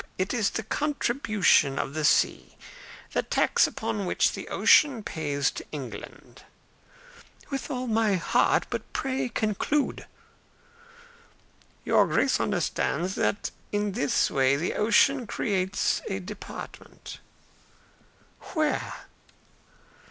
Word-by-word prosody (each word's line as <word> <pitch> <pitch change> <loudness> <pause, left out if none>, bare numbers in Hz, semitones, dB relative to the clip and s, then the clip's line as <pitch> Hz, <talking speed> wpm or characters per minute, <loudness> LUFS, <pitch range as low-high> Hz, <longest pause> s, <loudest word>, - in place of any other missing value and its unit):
It 185 +4 -1
is 225 -5 +1
the 220 - -4
contribution 220 - +1
of 135 - -3
the 155 0 -2
sea - - +2 0.6
the - - +2
tax - - +2
which 215 -4 0
the - - -7
ocean 270 -8 +4
pays 145 -6 -1
to - - -8
England." 140 -5 -9 1.1
"With 270 -1 -4
all 255 -2 -3
my 220 -3 +2
heart. 175 - +2
But - - -5
pray 265 -2 -2
conclude." 225 +8 -1 1.8
"Your - - +4
Grace - - +2
understands 185 +2 -1
that 205 - -1 0.2
in 205 0 0
this 145 -7 +1
way 135 0 +3
the 160 +5 -2
ocean 230 +4 +3
creates 195 -3 0
a 195 - -2
department." 195 +2 -9 1.4
"Where?" 310 -2 -1
210 Hz, 105 wpm, -27 LUFS, 180-250 Hz, 1.8 s, ocean